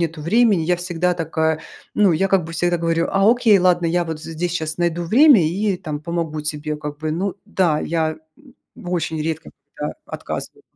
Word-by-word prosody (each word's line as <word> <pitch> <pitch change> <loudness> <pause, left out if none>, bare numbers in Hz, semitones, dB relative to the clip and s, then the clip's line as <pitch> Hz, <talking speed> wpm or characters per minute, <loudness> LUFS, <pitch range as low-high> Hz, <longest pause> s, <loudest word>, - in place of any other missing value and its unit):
нету 165 -1 -2
времени". 200 +2 +3
Я 175 +2 +1
всегда 175 0 -1
такая 160 -1 -1 0.3
ну, 200 -4 +4
я 190 +5 +1
как 190 -3 +2
бы 165 - -8
всегда 175 +1 +1
говорю: 165 0 0
"А, 195 +3 +4
окей, 235 -4 +4
ладно, 175 -2 +3
я 175 +1 +1
вот 160 -1 -5
здесь 165 +1 -4
щас 160 -2 -3
найду 175 0 0
время 235 - +6
и 195 +4 0
там 155 -5 -5
помогу 165 -1 -3
тебе 150 0 -3
как 150 -1 -7
бы, 155 0 -3
ну". 190 +4 -2
Да, 180 -7 +1
я, 160 -1 -1 0.2
м, 275 -4 -20 0.2
очень 170 -3 -3
редко 160 0 -4 0.3
когда - - -4
отказываю. - - -6
170 Hz, 190 wpm, -21 LUFS, 160-185 Hz, 0.3 s, время